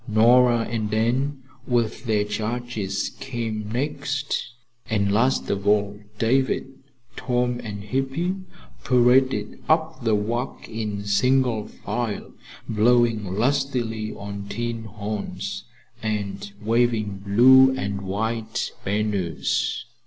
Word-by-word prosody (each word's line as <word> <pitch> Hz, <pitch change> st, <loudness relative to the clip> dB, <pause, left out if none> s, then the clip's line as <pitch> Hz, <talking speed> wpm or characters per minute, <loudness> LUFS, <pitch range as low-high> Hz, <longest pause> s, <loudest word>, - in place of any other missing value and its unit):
Nora 120 Hz, +2 st, +5 dB
and 110 Hz, -2 st, -2 dB
Anne, 130 Hz, +5 st, 0 dB, 0.2 s
with 120 Hz, -1 st, 0 dB
their 105 Hz, -3 st, +2 dB
charges, 105 Hz, -1 st, -3 dB
came 110 Hz, -5 st, -4 dB
next, 140 Hz, +2 st, -1 dB, 0.5 s
and 100 Hz, -3 st, +1 dB
last 120 Hz, +6 st, +2 dB
of 100 Hz, 0 st, -2 dB
all 105 Hz, -1 st, +2 dB, 0.2 s
David, 130 Hz, +4 st, +1 dB, 0.5 s
Tom 125 Hz, -1 st, 0 dB
and 100 Hz, -2 st, -6 dB
Hippy 135 Hz, -, -1 dB, 0.5 s
paraded 125 Hz, -3 st, +3 dB
up 160 Hz, -3 st, +1 dB
the 110 Hz, -2 st, +3 dB
walk, 120 Hz, +5 st, -3 dB
in 105 Hz, -2 st, -4 dB
single 120 Hz, +1 st, +2 dB
file, 120 Hz, -4 st, -4 dB, 0.3 s
blowing 115 Hz, 0 st, +3 dB
lustily 120 Hz, -3 st, 0 dB
on 100 Hz, 0 st, -7 dB
tin 115 Hz, +1 st, -3 dB
horns 105 Hz, -1 st, -5 dB, 0.4 s
and 100 Hz, -2 st, -3 dB
waving 110 Hz, -2 st, +1 dB
blue 130 Hz, +7 st, +7 dB
and 100 Hz, -2 st, -3 dB
white 110 Hz, +3 st, -2 dB
banners. 100 Hz, -5 st, -1 dB
115 Hz, 100 wpm, -24 LUFS, 105-125 Hz, 0.5 s, blue